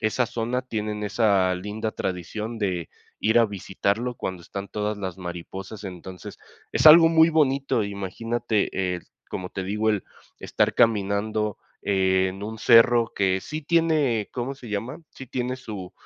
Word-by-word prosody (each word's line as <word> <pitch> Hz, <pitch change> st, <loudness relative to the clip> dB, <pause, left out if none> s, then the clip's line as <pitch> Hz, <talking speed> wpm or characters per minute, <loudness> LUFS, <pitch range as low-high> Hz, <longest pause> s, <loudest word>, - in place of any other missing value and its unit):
esa 115 Hz, +3 st, +1 dB
zona 120 Hz, +2 st, -2 dB
tienen 105 Hz, -3 st, -4 dB
esa 100 Hz, -3 st, +2 dB
linda 105 Hz, +4 st, -4 dB
tradición 105 Hz, +6 st, -4 dB
de 90 Hz, -5 st, -2 dB, 0.3 s
ir 110 Hz, +2 st, +3 dB
a 115 Hz, -, +5 dB
visitarlo 100 Hz, +4 st, -2 dB
cuando 90 Hz, -2 st, -5 dB
están 100 Hz, +2 st, -7 dB
todas 105 Hz, 0 st, -2 dB
las 95 Hz, -2 st, -5 dB
mariposas, 95 Hz, +4 st, -7 dB
entonces, 90 Hz, 0 st, -9 dB, 0.3 s
es -, -, +3 dB
algo 165 Hz, +1 st, +10 dB
muy 160 Hz, 0 st, +6 dB
bonito, 140 Hz, -6 st, +2 dB
imagínate, 100 Hz, -1 st, -2 dB
el 85 Hz, -, -11 dB, 0.2 s
como 90 Hz, -1 st, -5 dB
te 95 Hz, -, -4 dB
digo, 105 Hz, +3 st, 0 dB
el 105 Hz, -3 st, -1 dB, 0.3 s
estar -, -, 0 dB
caminando 105 Hz, -1 st, +1 dB, 0.2 s
en 95 Hz, 0 st, +1 dB
un 110 Hz, +1 st, -6 dB
cerro 115 Hz, 0 st, +5 dB
que 95 Hz, -1 st, +1 dB
sí 155 Hz, +8 st, -5 dB
tiene, 150 Hz, -9 st, +2 dB
¿cómo 130 Hz, +2 st, -3 dB
se 125 Hz, -4 st, -12 dB
llama?, 105 Hz, +7 st, -4 dB, 0.2 s
sí 130 Hz, -, -9 dB
tiene 125 Hz, +1 st, -3 dB
su 105 Hz, -7 st, -8 dB
105 Hz, 150 wpm, -25 LUFS, 95-120 Hz, 0.3 s, algo